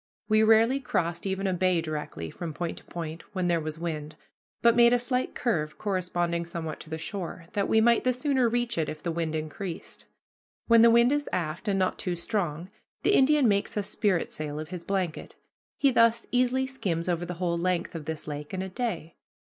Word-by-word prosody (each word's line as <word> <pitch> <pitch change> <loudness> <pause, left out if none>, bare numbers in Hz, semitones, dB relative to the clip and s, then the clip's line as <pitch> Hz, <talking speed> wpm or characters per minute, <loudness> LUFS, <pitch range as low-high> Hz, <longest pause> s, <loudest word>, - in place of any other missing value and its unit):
We 215 0 +4
rarely 225 +4 +5
crossed 175 -8 -1
even 190 +1 -2
a 190 - +1
bay 180 -1 +2
directly, 150 - -5
from 165 -3 -6
point 175 -1 -4
to - - -21
point, 165 -1 -6
when 185 -1 0
there 170 -1 +2
was 155 0 -5
wind, 155 -2 -4 0.5
but 235 -1 +6
made 235 0 +6
a - - +5
slight 250 +1 -1
curve 155 -11 -1
corresponding 175 -3 -1
somewhat 165 -2 -5
to 155 - -11
the 160 - -3
shore, 175 0 -6
that 200 -1 0
we 220 - +4
might 235 +1 +4
the 255 - +3
sooner 255 -1 +1
reach 240 -2 -1
it 155 - 0
if 155 0 -7
the 170 - -1
wind 160 -1 -2
increased. 160 +4 -6 0.6
When 230 -1 +6
the 235 - +8
wind 235 +2 +5
is 290 0 0
aft, 170 +4 -3
and 200 -1 +2
not 185 -1 0
too 180 -2 -2
strong, 175 -2 -2 0.3
the 405 - +3
Indian 285 -2 +5
makes 200 0 +1
a 205 - +1
spritsail 170 -7 -1
of 155 - -6
his 180 -2 -6
blanket. 185 -4 -3 0.4
He 275 - +4
thus 230 -1 +4
easily 255 +1 +2
skims 200 -11 -2
over 175 -1 0
the 175 0 -5
whole 170 -1 -1
length 180 0 -1
of 160 -3 -6
this 160 0 -5
lake 150 +3 -5
in 190 - -2
a 190 - -5
day. 180 -7 -4
185 Hz, 205 wpm, -27 LUFS, 165-230 Hz, 0.6 s, the